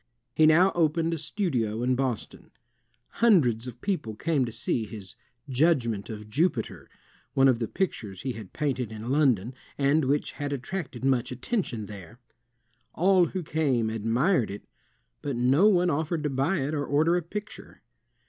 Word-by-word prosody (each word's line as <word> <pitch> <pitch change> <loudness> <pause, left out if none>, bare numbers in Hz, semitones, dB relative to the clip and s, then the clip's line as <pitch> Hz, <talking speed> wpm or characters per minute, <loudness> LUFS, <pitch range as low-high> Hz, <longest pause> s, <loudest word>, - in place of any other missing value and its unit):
He 155 - +5
now 175 +5 +5
opened 165 0 +1
a 165 - -3
studio 130 - -1
in 130 +1 +2
Boston. 130 -4 -3 0.7
Hundreds 130 - +4
of 125 -1 -9
people 175 - -2
came 150 0 0
to 115 - -5
see 115 0 -1
his 100 -4 -9 0.3
"Judgment 125 -7 +1
of 105 -1 -7
Jupiter," 140 0 -1 0.5
one 135 0 +5
of 125 -3 +3
the 115 - -1
pictures 105 - -3
he 130 - -1
had 110 -4 -9
painted 130 -7 -2
in 110 +3 -5
London 130 -6 +2 0.2
and 140 +2 +2
which 140 +3 0
had 145 -1 -4
attracted 135 -2 -5
much 130 -3 +1
attention 125 - -2
there. 100 +1 -11 0.8
All 185 0 +4
who 185 +2 -4
came 135 -8 0
admired 115 - +1
it, 100 - -7 0.6
but 140 -3 -3
no 130 - +4
one 180 -4 +3
offered 160 +2 -1
to 150 - -1
buy 135 +6 0
it 140 +3 -2
or 145 -2 -1
order 155 +5 +3
a 180 - +1
picture. 210 +6 -8
135 Hz, 160 wpm, -27 LUFS, 115-165 Hz, 0.8 s, He